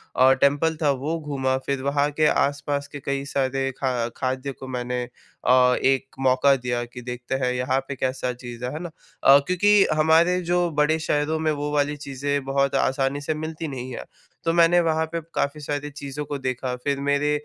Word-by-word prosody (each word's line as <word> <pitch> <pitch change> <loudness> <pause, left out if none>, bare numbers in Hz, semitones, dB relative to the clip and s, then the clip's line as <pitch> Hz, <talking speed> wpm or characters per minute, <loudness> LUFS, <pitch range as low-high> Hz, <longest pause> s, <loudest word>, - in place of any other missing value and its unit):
अ, 130 +1 +6
temple 145 +3 +3
था 150 - +3
वो 160 +3 -1
घूमा 135 -3 -1
फिर 140 -1 -1
वहाँ 140 +1 +1
के 155 +1 +1
आस-पास 145 0 0
के 145 - -8
कई 140 0 -2
सारे 135 -1 -1
खा 130 -2 0 0.3
खाद्य 130 +2 -2
को 130 0 -10
मैंने 125 -1 -3
अ, 125 +1 +1
एक 135 0 +1
मौका 135 +1 +4
दिया 120 -2 -2
कि 125 +1 -10
देखते 125 +1 -4
हैं 125 - +1
यहाँ 125 +1 0
पे 140 - -4
कैसा 130 -1 -2
चीज़ 120 -1 -8
है, 125 - -3
है 155 - -4
ना? 175 0 -6 0.3
अ, 140 +1 +8
क्योंकि 200 +3 +4
हमारे 160 +4 +4
जो 175 0 +2
बड़े 155 +2 +2
शहरों 155 0 0
में 155 0 +1
वो 145 0 -3
वाली 145 0 +1
चीज़ें 140 0 -3
बहुत 140 0 +1
आसानी 135 +1 0
से 150 +2 -1
मिलती 155 +1 -5
नहीं 130 -2 -6
है। - - -6 0.4
तो 165 - +2
मैंने 170 +1 +5
वहाँ 160 -1 +1
पे 165 +1 -4
काफ़ी 140 +2 -1
सारी 145 0 -3
चीज़ों 145 0 -6
को 145 0 -4
देखा। 130 -1 -3
फिर 140 -1 0
मेरे 145 +1 +1
140 Hz, 195 wpm, -24 LUFS, 130-150 Hz, 0.4 s, अ